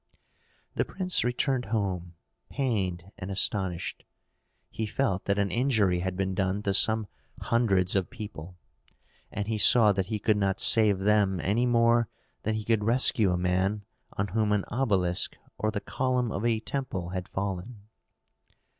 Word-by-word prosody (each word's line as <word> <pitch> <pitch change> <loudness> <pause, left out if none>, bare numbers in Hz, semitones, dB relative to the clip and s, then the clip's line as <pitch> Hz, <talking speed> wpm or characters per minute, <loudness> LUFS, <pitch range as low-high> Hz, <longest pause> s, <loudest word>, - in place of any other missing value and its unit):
The - - 0
prince 185 -1 0
returned 125 +1 0
home 95 -5 -3 0.3
pained 95 -8 -2
and 90 - -6
astonished. 95 -2 -2 0.7
He 110 - -3
felt 100 -5 -1
that 100 0 0
an 100 -1 0
injury 110 -8 +1
had 95 0 -3
been 95 -1 -1
done 95 +1 -1
to 100 - 0
some 110 +2 +4 0.3
hundreds 100 -6 +1
of 95 -2 0
people, 100 -7 -9 0.7
and 105 -1 -4
he 110 -1 -2
saw 110 -1 +7
that 95 -2 -2
he 110 - -2
could 105 0 +1
not 100 -1 0
save 105 -3 +5
them 100 -1 +2
any 115 +6 +1
more 115 -2 +3 0.3
than 110 0 -2
he 110 -1 -4
could 110 -2 +1
rescue 115 -3 +4
a 90 - 0
man 95 +3 -1 0.3
on 100 0 -2
whom 105 +2 0
an 100 -2 0
obelisk 100 -8 0 0.2
or 110 - 0
the 110 -1 -3
column 125 0 -1
of 100 - -4
a 115 -2 +1
temple 115 -8 -4
had 90 -1 -5
fallen. 100 +3 -5
105 Hz, 155 wpm, -27 LUFS, 95-115 Hz, 0.7 s, saw